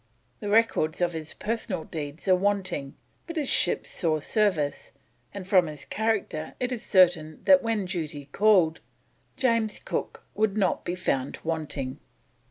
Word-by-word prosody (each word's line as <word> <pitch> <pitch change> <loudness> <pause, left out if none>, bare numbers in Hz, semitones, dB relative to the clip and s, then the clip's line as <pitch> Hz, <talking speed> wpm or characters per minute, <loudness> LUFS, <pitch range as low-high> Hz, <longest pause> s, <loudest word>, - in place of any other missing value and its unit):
The 205 - -4
records 205 -7 +2
of 175 -1 +1
his 160 -1 -6
personal 225 -7 -3
deeds 155 +2 -6
are 185 - +6
wanting, 190 -7 -1 0.3
but 335 - -6
his 300 -4 0
ships - - +1
saw 160 -3 0
service, 160 -6 0 0.4
and 200 -2 -7
from 185 -3 +4
his 150 -2 -8
character 215 -8 -2
it 250 0 -1
is 245 -3 -3
certain 175 -5 +3
that 280 -1 +6
when 225 -4 -1
duty 155 -5 -4
called, 185 -6 +4 0.6
James 230 -4 +1
Cook - - -4
would 215 -1 0
not 195 -3 +1
be 175 - -2
found 135 -7 -1
wanting. 150 -4 -3
180 Hz, 150 wpm, -27 LUFS, 155-215 Hz, 0.6 s, are